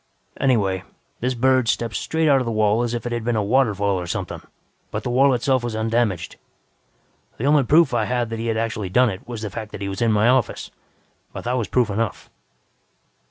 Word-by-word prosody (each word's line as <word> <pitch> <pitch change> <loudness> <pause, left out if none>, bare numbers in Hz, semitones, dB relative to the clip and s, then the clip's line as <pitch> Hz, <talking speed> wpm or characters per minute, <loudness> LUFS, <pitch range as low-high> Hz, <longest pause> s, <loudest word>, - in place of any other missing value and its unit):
"Anyway, 100 -8 +1 0.4
this 125 +1 -1
bird 130 0 +2
stepped 115 0 0
straight 160 0 0
out 140 -2 +5
of 130 - -2
the - - -1
wall 110 +1 +2
as 120 0 -1
if 120 - -5
it 120 - -3
had 120 -1 -2
been 120 0 0
a 105 - +1
waterfall 100 -4 +1
or 90 - -5
something, - - -4 0.5
but - - -4
the - - -2
wall 135 +3 +4
itself 130 0 +1
was 120 -2 -3
undamaged. 110 -5 -1 1.0
The 120 - -3
only 145 0 +5
proof 145 +1 +4
I 115 -3 +1
had 120 0 -1
that 115 - -4
he 115 - -3
had 110 -1 0
actually 110 -4 -2
done 125 +4 +3
it 95 - -9
was 115 -3 -6
the 105 - -4
fact 110 +1 -6
that 105 - -7
he 100 - -2
was 95 +2 -5
in 115 -1 +3
my 105 +1 +3
office, 125 -3 +1 0.6
but - - -7
that 120 - -1
was 120 -5 -1
proof 120 -2 +1
enough. 110 +1 -3
115 Hz, 220 wpm, -22 LUFS, 105-125 Hz, 1.0 s, out